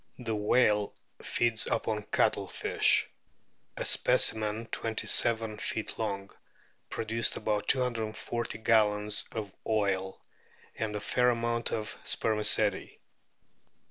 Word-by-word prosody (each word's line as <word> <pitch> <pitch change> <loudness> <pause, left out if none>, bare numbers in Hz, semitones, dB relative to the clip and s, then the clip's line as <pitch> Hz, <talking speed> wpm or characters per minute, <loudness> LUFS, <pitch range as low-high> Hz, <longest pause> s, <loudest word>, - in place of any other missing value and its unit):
The 115 -3 -4
whale 105 -1 +1 0.3
feeds 115 -2 0
upon 110 -1 -2
cuttlefish. - - +1 0.7
A - - -4
specimen 110 +1 +3
twenty 110 -1 -2
seven 110 -2 +2
feet 110 - -4
long 100 -3 -4 0.6
produced 115 +1 -1
about 105 -1 -2
240 120 -2 0
gallons 105 -2 +2
of 105 -4 -6
oil, 100 -3 -1 0.6
and 110 -2 -4
a - - -3
fair 125 +4 +1
amount 115 0 -2
of 110 -1 -4
spermaceti. 105 -1 +2
110 Hz, 100 wpm, -29 LUFS, 105-115 Hz, 0.7 s, specimen